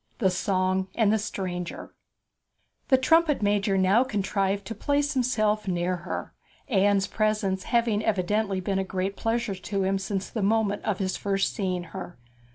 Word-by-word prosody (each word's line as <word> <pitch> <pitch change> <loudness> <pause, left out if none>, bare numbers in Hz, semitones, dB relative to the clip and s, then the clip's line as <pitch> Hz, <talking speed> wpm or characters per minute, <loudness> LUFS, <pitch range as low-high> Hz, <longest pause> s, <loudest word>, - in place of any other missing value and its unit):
THE 190 -6 +2
SONG 185 0 0
AND 215 -3 +3
THE 220 - +2
STRANGER 180 -4 -5 0.9
The 260 - +5
trumpet 310 -1 +3
major 205 -1 +2
now 190 +6 +4
contrived 200 -4 -1
to 225 - -5
place 285 +6 0
himself 215 -5 +1
near 180 0 0
her, 170 - -6 0.3
Anne's 200 -4 +3
presence 210 -4 0
having 230 -3 +1
evidently 205 -1 0
been 195 +1 -1
a - - +1
great 190 +1 -3
pleasure 230 -1 -1
to 195 +1 -3
him 195 +1 +1
since 195 0 -3
the 220 - -4
moment 205 0 +1
of 210 -4 0
his 190 -1 -2
first 195 -1 0
seeing 185 -4 -2
her. 185 -2 -7
200 Hz, 160 wpm, -26 LUFS, 190-220 Hz, 0.9 s, The